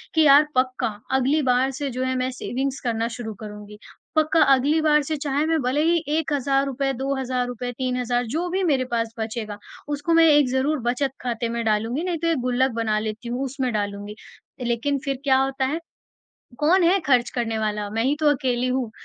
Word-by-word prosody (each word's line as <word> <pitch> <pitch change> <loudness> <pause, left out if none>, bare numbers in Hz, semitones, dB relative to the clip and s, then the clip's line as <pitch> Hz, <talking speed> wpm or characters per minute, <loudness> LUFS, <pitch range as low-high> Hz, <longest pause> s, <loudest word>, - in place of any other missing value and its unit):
कि 320 - +5
यार 290 +1 +7
पक्का 255 -1 +1 0.3
अगली 270 +4 +2
बार 255 +2 +2
से 280 +1 -4
जो 255 0 -3
है 260 0 -1
मैं 255 0 0
सेविंग्स 265 +2 -3
करना 230 -1 0
शुरू 220 -3 -5
करूँगी। 210 0 -9 0.4
पक्का 315 +1 +3
अगली 290 +5 +2
बार 300 -1 +4
से 310 +3 -2
चाहे 285 +1 -1
मैं 320 -1 +1
भले 260 +4 +1
ही 335 0 +2
1 320 -1 -1
हज़ार 275 0 +1
रुपये 275 0 -1
2 270 +2 -2
हज़ार 250 -1 -1
रुपये 245 0 -4
3 255 -1 -1
हज़ार 245 0 0
जो 345 +3 -1
भी 380 +2 -1
मेरे 275 -7 +2
पास 230 -1 -1
बचेगा 220 -2 -4 0.3
उसको 290 +3 -1
मैं 330 0 +6
एक 290 -3 +5
ज़रूर 270 +3 0
बचत 260 +2 0
ख़ाते 235 -1 -2
में 235 0 -2
डालूँगी 225 +7 0
नहीं 355 -2 -1
तो 335 - -1
एक 330 -3 +2
गुल्लक 255 +1 +1
बना 215 -1 +1
लेती 220 +2 -5
हूँ 250 +3 -2
उसमें 260 -1 -2
डालूँगी। 205 0 -3 0.5
लेक़िन 255 +4 0
फ़िर 275 -2 -2
क्या 265 -2 +4
होता 270 0 -1
है? 300 +5 -1 0.8
कौन 345 +5 +4
है 370 +3 +4
ख़र्च 245 -3 +3
करने 230 -2 -2
वाला, 210 -1 -2
मैं 225 +2 -1
ही 275 - +2
तो 305 - +1
अकेली 255 -3 0
हूँ। 255 -3 -1
260 Hz, 210 wpm, -23 LUFS, 240-290 Hz, 0.8 s, यार